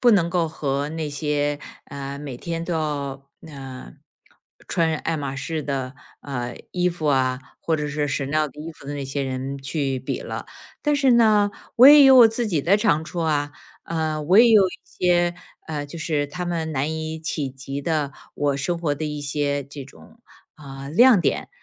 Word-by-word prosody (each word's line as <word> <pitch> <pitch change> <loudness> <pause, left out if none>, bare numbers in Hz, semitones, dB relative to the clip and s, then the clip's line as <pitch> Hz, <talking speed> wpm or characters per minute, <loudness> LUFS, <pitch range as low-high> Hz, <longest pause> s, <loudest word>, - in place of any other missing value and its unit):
不 245 - +6
能 185 -6 +3
够 170 -1 +1
和 140 -2 -2
那 160 -1 -3
些， 145 0 -1 0.3
呃， 140 0 -6
每 140 -4 -7
天 165 +3 -4
都 170 -1 -2
要， 140 -3 -3 0.2
嗯， 135 - -10 0.7
穿 165 -2 +1
爱 165 +2 -2
马 140 -3 -4
仕 150 +3 -3
的， 135 -2 -3 0.3
呃， 125 -3 -5 0.2
衣 180 0 +1
服 170 -3 -5
啊， 130 -2 +2 0.2
或 165 - 0
者 150 -1 -3
是 150 0 -1
CHANEL 145 +2 -1
的 145 - -12
衣 160 +2 -6
服 145 -3 -15
的 145 - -4
那 140 -1 -4
些 135 +1 -3
人 135 +1 -4
去 135 -1 -2
比 130 - -4
了。 - - -6 0.4
但 295 -1 +2
是 275 -3 +4
呢， 215 -3 +4 0.3
我 250 +3 +9
也 290 -1 +9
有 265 -1 +8
我 240 -3 +9
自 225 +1 -2
己 170 -8 0
的 180 +8 +3
长 205 -8 +2
处 170 +2 -5
啊， 145 -3 0 0.3
嗯， 155 -2 -2
我 185 +6 +5
也 235 +1 +8
有 205 -4 +6
一 195 - -11
些， 175 -1 +1 0.3
呃， 150 -2 -4
就 170 +3 -9
是 150 -2 -1
他 165 +5 -5
们 165 -2 -2
难 145 +2 -1
以 160 0 -4
企 155 -3 -3
及 135 +1 -6
的 150 -2 -1 0.2
我 145 -1 0
生 155 +5 -2
活 155 -4 0
的 150 +2 -5
一 150 -1 -4
些， 145 0 -1
这 140 +1 -9
种， 225 - -17 0.4
啊， 135 -2 -9
亮 235 - +6
点。 - - -1
150 Hz, 220 characters per minute, -23 LUFS, 140-170 Hz, 0.7 s, 我